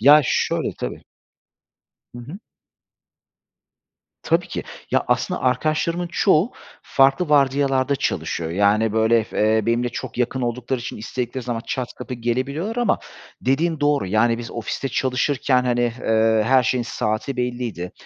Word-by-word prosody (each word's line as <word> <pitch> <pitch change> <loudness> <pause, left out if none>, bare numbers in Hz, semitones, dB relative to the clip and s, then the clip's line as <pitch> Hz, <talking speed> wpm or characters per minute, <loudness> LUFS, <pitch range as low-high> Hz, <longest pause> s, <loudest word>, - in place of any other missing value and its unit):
Ya 145 +6 +8
şöyle - - 0
tabii. - - -5 1.1
Hı - - -8
hı. 145 +11 -9 1.8
Tabii - - +1
ki. - - -4 0.3
Ya, - - +2
aslında 180 - 0
arkadaşlarımın 155 +7 0
çoğu 190 +4 +3 0.3
farklı 135 +5 +3
vardiyalarda 140 -1 +2
çalışıyor. 85 -9 -2
Yani, 105 +4 +2
böyle 110 0 +3
f - - -7 0.2
eee, 110 -1 0
benimle 120 +1 +1
çok 120 - -7
yakın 125 +1 0
oldukları 125 +2 -2
için 120 - -6
istedikleri 120 +3 -4
zaman 120 -2 -2
çat 130 -2 -3
kapı 125 - -6
gelebiliyorlar 135 - -2
ama 240 -4 +2 0.4
dediğin 155 +4 0
doğru, 145 -7 +2
yani, 115 +4 +2
biz 120 - -7
ofiste 120 +4 -4
çalışırken, 130 0 +1
hani, 120 -1 +1 0.2
eee, 110 0 +3
her 130 +1 +5
şeyin 125 0 0
saati 115 +3 -2
belliydi. 120 -8 -3
125 Hz, 135 wpm, -22 LUFS, 115-140 Hz, 1.8 s, Ya